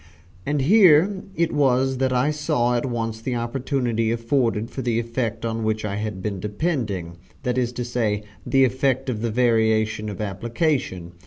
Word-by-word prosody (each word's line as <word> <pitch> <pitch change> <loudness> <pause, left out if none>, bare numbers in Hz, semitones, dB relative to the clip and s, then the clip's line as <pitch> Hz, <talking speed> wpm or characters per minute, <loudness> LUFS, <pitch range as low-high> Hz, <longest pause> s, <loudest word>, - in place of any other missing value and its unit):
And 145 -1 +1
here 190 +1 +5
it 170 0 +1
was 130 -2 +2
that 130 -1 +1
I 130 +4 +2
saw 150 -5 0
at 120 +2 -1
once 115 -2 -3
the 125 +2 -2
opportunity 120 -1 -1
afforded 115 -1 0
for 130 - -4
the 120 -2 0
effect 115 0 -2
on 115 0 -2
which 110 0 -1
I 100 -1 -3
had 105 -3 -4
been 100 -3 -3
depending, 105 - -2 0.3
that 125 - 0
is 125 -2 0
to 120 0 -4
say, 110 -4 -1 0.2
the 135 -1 +4
effect 130 +1 0
of 110 -3 -4
the 115 - 0
variation 110 -2 +2
of 100 - -7
application. 105 - -2
120 Hz, 170 wpm, -23 LUFS, 110-135 Hz, 0.3 s, here